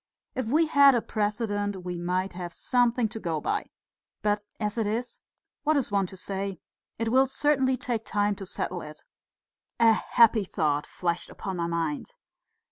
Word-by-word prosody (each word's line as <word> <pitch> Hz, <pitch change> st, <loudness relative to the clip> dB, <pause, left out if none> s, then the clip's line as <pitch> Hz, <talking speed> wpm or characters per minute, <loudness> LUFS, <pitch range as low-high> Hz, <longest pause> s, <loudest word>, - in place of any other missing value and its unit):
If 260 Hz, -4 st, -2 dB
we 310 Hz, +7 st, +4 dB
had 280 Hz, -3 st, +6 dB
a 235 Hz, -, +2 dB
precedent 205 Hz, -3 st, -2 dB
we 180 Hz, 0 st, -3 dB
might 180 Hz, +2 st, -1 dB
have 175 Hz, -1 st, -6 dB
something 245 Hz, -2 st, +2 dB
to 225 Hz, -, -6 dB
go 165 Hz, -6 st, -2 dB
by. -, -, -2 dB, 0.6 s
But 210 Hz, 0 st, +2 dB, 0.2 s
as 210 Hz, -2 st, -1 dB
it 220 Hz, -, +1 dB
is, 235 Hz, +4 st, -3 dB, 0.4 s
what 310 Hz, 0 st, +2 dB
is 265 Hz, -6 st, 0 dB
one 200 Hz, -2 st, +2 dB
to 190 Hz, -, -10 dB
say? 195 Hz, -1 st, -4 dB, 0.4 s
It 230 Hz, 0 st, -1 dB
will 260 Hz, +3 st, +4 dB
certainly 265 Hz, -1 st, +2 dB
take 235 Hz, -2 st, -2 dB
time 205 Hz, -1 st, +1 dB
to 195 Hz, -, -7 dB
settle 175 Hz, 0 st, -3 dB
it." 150 Hz, 0 st, -10 dB, 0.8 s
A 230 Hz, -1 st, +7 dB
happy 225 Hz, 0 st, +4 dB
thought 150 Hz, -5 st, 0 dB
flashed 175 Hz, -1 st, -2 dB
upon 190 Hz, -2 st, -5 dB
my 170 Hz, -1 st, -1 dB
mind. 170 Hz, -, -2 dB
205 Hz, 170 wpm, -27 LUFS, 180-240 Hz, 0.8 s, A